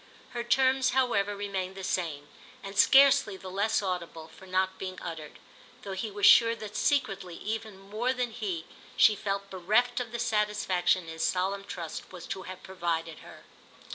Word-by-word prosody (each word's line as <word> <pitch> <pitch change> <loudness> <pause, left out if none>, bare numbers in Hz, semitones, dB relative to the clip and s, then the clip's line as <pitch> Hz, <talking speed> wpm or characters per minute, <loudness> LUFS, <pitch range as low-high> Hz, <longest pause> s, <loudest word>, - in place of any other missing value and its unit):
Her 240 -1 -3
terms, 260 +1 +2
however, 205 -6 +1
remained 195 -2 -4
the 195 - -7
same, 160 -6 -2 0.4
and 195 0 -8
scarcely 265 -3 +6
the 190 -1 -9
less 205 +3 +1
audible 170 -4 -4
for 190 +4 -15
not 190 0 0
being 185 -1 -6
uttered; 160 -3 -7 0.5
though 195 - -5
he 190 +3 -3
was 205 0 -1
sure 230 0 +7
that 215 -2 -9
secretly 205 - 0
even 220 -1 -5
more 215 +6 -2
than 250 -2 -2
he 195 -8 -4 0.3
she 215 - +6
felt 200 -1 -3
bereft 215 +7 +1
of 240 -3 -5
the 235 - -3
satisfaction 210 -5 +1
his 160 0 -4
solemn 195 +2 0
trust 170 -5 -7
was 180 -3 -9
to 190 - -5
have 185 - -9
provided 165 -3 -3
her. - - -14
195 Hz, 170 wpm, -29 LUFS, 185-220 Hz, 0.5 s, sure